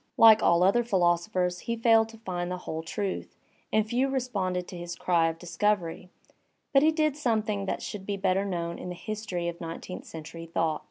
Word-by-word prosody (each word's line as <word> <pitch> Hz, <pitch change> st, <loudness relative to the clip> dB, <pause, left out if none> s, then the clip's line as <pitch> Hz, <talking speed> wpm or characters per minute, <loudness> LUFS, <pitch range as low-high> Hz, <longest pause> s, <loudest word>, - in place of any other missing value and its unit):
like 220 Hz, -1 st, +8 dB
all 170 Hz, +1 st, +4 dB
other 200 Hz, +6 st, +4 dB
philosophers 180 Hz, -2 st, +1 dB
he 235 Hz, -, -3 dB
failed 225 Hz, -1 st, +4 dB
to 225 Hz, -, -12 dB
find 180 Hz, -5 st, -4 dB
the 180 Hz, -, -3 dB
whole 160 Hz, -, -3 dB
truth, 190 Hz, +4 st, -4 dB, 0.4 s
and 215 Hz, 0 st, +2 dB
few 250 Hz, +4 st, +1 dB
responded 195 Hz, -9 st, -1 dB
to -, -, -8 dB
his 175 Hz, 0 st, -6 dB
cry 170 Hz, -2 st, +2 dB
of 165 Hz, -, -6 dB
dis 175 Hz, 0 st, -9 dB
covery, 185 Hz, -4 st, 0 dB, 0.6 s
but 275 Hz, -, +6 dB
he 310 Hz, +2 st, +5 dB
did 310 Hz, -2 st, +1 dB
something 215 Hz, -7 st, 0 dB
that -, -, -2 dB
should 205 Hz, -2 st, -5 dB
be 200 Hz, -1 st, -1 dB
better 190 Hz, 0 st, +1 dB
known 170 Hz, -3 st, -3 dB
in -, -, -6 dB
the 180 Hz, -, -5 dB
history 210 Hz, -4 st, -4 dB
of 170 Hz, 0 st, -5 dB
nineteenth 165 Hz, +2 st, -6 dB
century 165 Hz, +1 st, -8 dB
thought. 165 Hz, -2 st, 0 dB
185 Hz, 200 wpm, -28 LUFS, 175-220 Hz, 0.6 s, like